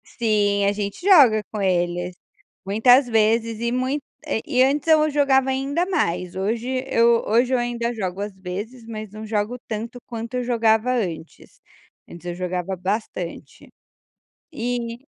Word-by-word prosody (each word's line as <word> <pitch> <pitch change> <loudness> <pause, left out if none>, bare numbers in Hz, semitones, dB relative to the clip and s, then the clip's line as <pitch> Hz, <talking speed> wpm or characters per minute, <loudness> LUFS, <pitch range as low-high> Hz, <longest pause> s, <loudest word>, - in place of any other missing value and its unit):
Sim, 205 -3 +1
a 200 - +3
gente 205 - -4
joga 265 - +6
com 215 - -4
eles, 175 -1 0 0.5
muitas 245 +6 +5
vezes 225 0 +2
e 235 0 -1
muito 255 +4 -1 0.2
eh, 285 -7 -1
e 255 0 +3
antes 285 +3 +1
eu 310 -1 +5
jogava 275 -2 +3
ainda 275 +6 -1
mais, 180 - -1
hoje 235 +7 -2
eu 235 -2 +3
hoje 245 +4 +2
eu - - +4
ainda 240 0 -2
jogo, 190 -3 -4
às 205 0 -4
vezes, 205 +6 -7
mas 215 -2 -7
não 215 +1 -8
jogo 215 +2 -2
tanto, 230 +3 -5
quanto 230 +1 -6
eu 250 - -1
jogava 230 0 +2
antes; 175 -9 -5 0.5
antes 170 0 -12
eu 175 - -3
jogava 180 +1 -3
bastante. 185 -1 -5 0.8
E 240 -2 -4
225 Hz, 150 wpm, -22 LUFS, 200-250 Hz, 0.8 s, joga